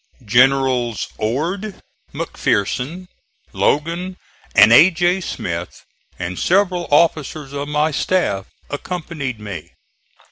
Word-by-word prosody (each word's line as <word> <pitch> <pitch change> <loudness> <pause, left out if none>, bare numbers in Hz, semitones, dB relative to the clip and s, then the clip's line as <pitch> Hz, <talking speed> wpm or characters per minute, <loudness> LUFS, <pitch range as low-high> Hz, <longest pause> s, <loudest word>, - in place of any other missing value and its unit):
Generals 125 0 +2
Ord, 170 - -2 0.3
McPherson, 135 - -2 0.5
Logan 170 +5 0 0.4
and 110 +2 +8
A. 160 +10 +8
J. 180 +2 +1
Smith, 85 - -5 0.3
and 90 +1 -4
several 180 -2 +1
officers 150 -2 +1
of 140 0 -4
my 150 +1 +1
staff, 140 - 0 0.2
accompanied 150 -5 -4
me. 100 -7 -8
145 Hz, 95 wpm, -19 LUFS, 120-175 Hz, 0.5 s, and